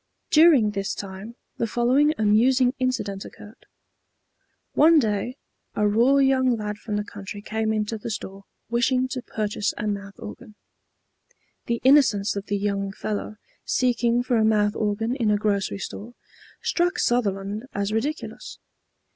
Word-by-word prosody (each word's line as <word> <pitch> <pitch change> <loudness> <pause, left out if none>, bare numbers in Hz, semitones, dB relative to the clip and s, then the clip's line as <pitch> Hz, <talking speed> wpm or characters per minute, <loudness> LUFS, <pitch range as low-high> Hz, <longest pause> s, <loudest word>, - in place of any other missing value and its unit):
During 300 -9 +6
this 195 -1 -3
time 200 +4 -8 0.2
the 230 - -1
following 260 +7 +2
amusing 245 +4 +3
incident 210 -7 -2
occurred. 210 +4 -14 1.1
One 325 +2 +6
day 225 0 0 0.4
a 210 - +2
raw 235 +6 +4
young 260 -3 +3
lad 210 -1 -5
from 210 -3 -4
the 210 - -1
country 205 0 -8
came 220 +1 -2
into 215 0 -2
the 220 - -6
store 195 -2 -6 0.2
wishing 250 +2 +1
to 255 -1 -4
purchase 210 -2 -2
a 210 - -3
mouth 200 -1 -4
organ. 220 0 -10 1.1
The 235 0 -1
innocence 240 -8 +4
of 200 0 -5
the 205 - 0
young 200 -1 -2
fellow, 210 +1 -5 0.3
seeking 245 -1 +1
for 245 -1 +1
a 220 - +3
mouth 210 -1 +2
organ 225 +3 -1
in 235 -6 0
a 210 - +3
grocery 200 -1 -1
store, 225 +4 -8 0.5
struck 355 +4 +1
Sutherland 210 - -1
as 200 +1 -1
ridiculous. 285 +8 -4
220 Hz, 145 wpm, -24 LUFS, 205-250 Hz, 1.1 s, During